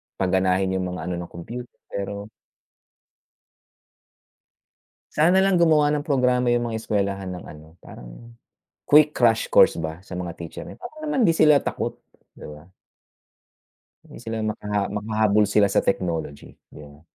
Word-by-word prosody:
paganahin 95 0 +1
yung 90 - -2
mga - - -6
ano - - -2
ng 85 - -8
computer 120 +9 -9
pero 100 +1 -5 2.8
Sana 180 +5 +4
lang 195 -2 +3
gumawa 155 -3 +4
ng 150 0 -2
programa 125 -3 +2
yung 120 -1 -1
mga 110 - -3
eskuwelahan 100 -2 -2
ng 90 - -8
ano, 80 +2 -13
parang - - -12 0.5
quick 150 +1 +5
crash 115 -2 +2
course - - +4
ba, 80 +2 -5
sa 90 -2 -8
mga 90 -2 -5
teacher 85 -1 -9
eh, - - -10
parang 310 +6 -11
naman 285 -4 0
hindi 190 - +5
sila 150 -3 +4
takot, - - -3 0.4
di - - -16
ba? 75 +2 -11 1.4
Hindi - - -14
sila 115 0 -4
maka 105 -2 -2
makahabol 105 0 +1
sila 105 0 +3
sa - - +1
technology, 85 -6 -3 0.2
di - - -12
ba? 75 0 -14
105 Hz, 145 wpm, -23 LUFS, 90-125 Hz, 2.8 s, quick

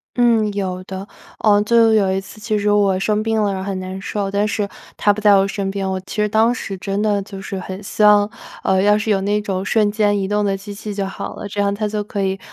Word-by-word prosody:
嗯， 230 -3 +3
有 185 -2 -3
的。 190 +1 -7 0.3
呃， 205 -1 +4
就 225 +1 +4
有 195 -3 +3
一 190 - 0
次 195 +2 -12
其 215 0 0
实 205 0 +1
我 200 -2 +3
生 210 +2 +1
病 225 0 0
了， 205 -1 +1
然 190 - -4
后 200 - -4
很 190 - -3
难 185 +1 -6
受， 200 0 -3
但 205 +1 +1
是 205 -1 -1 0.3
他 205 - +3
不 215 - -6
在 205 -1 +6
我 195 0 +3
身 195 -1 -3
边。 195 -1 -3
我 190 0 -2
其 190 - -9
实 210 0 +1
当 220 +3 +3
时 200 -5 -5
真 195 +2 -3
的 205 -2 +1
就 195 0 -9
是 190 0 -5
很 190 +2 -7
希 215 - -4
望， 205 -1 +6 0.4
呃， 190 0 +2
要 210 +1 +4
是 215 +1 -1
有 195 -1 +2
那 205 +2 +1
种 190 -2 -3
瞬 210 0 +2
间 205 -1 +2
移 190 - -1
动 210 +1 0
的 195 -1 0
机 205 +1 -9
器 210 +1 -7
就 200 -1 -2
好 195 - -6
了， 205 - -6
这 205 0 -2
样 200 0 +1
他 210 +1 -2
就 210 0 -2
可 200 -1 -3
以 190 0 -1
205 Hz, 290 characters per minute, -19 LUFS, 195-210 Hz, 0.4 s, 在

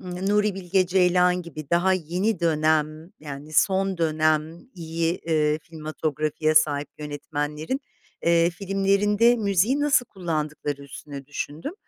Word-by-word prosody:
Nuri 195 +3 0
Bilge 185 0 +1
Ceylan 180 0 +3
gibi 155 -4 -9
daha 175 +2 +3
yeni 185 +4 -1
dönem, 155 0 +1
yani, 145 0 -8
son 190 +1 +2
dönem 155 0 +1
iyi, 165 0 -2
eee, 155 -2 +1
filmatografi'ye 155 -1 -2
sahip 150 -2 +3
yönetmenlerin, 150 - -4 0.4
eee, 170 0 +4
filmlerinde 200 +5 +2
müziği 210 +6 +1
nasıl 275 -5 +3
kullandıkları 150 -5 -4
üstüne 140 0 -9
düşündüm, 150 - -5
165 Hz, 110 wpm, -24 LUFS, 155-190 Hz, 0.4 s, eee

